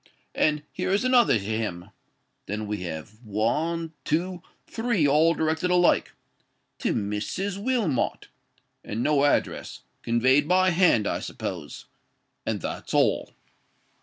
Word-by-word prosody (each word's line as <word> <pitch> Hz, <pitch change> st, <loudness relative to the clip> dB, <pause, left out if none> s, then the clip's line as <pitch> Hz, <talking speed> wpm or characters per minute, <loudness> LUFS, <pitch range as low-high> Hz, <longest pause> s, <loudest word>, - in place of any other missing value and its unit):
—And 150 Hz, -1 st, +1 dB
here -, -, -3 dB
is 200 Hz, +5 st, +2 dB
another 250 Hz, -, +4 dB
to 100 Hz, -, -6 dB
him.—Then 105 Hz, 0 st, -6 dB
we 105 Hz, 0 st, -3 dB
have 90 Hz, +5 st, -7 dB
one—two—three, 165 Hz, -, -1 dB
all 155 Hz, +4 st, +4 dB
directed 160 Hz, +3 st, 0 dB
alike—to 180 Hz, -1 st, -1 dB
'Mrs. 115 Hz, -, -3 dB
Wilmot,' 220 Hz, -, 0 dB, 0.6 s
and 110 Hz, +3 st, -3 dB
no 145 Hz, -2 st, +3 dB
address: 145 Hz, -, -1 dB, 0.2 s
conveyed 130 Hz, +5 st, +3 dB
by 185 Hz, +1 st, +4 dB
hand, 170 Hz, -, +4 dB
I -, -, -1 dB
suppose. 80 Hz, -6 st, -6 dB, 0.6 s
And -, -, -1 dB
that's -, -, -5 dB
all." -, -, +2 dB
150 Hz, 105 wpm, -26 LUFS, 110-180 Hz, 0.6 s, another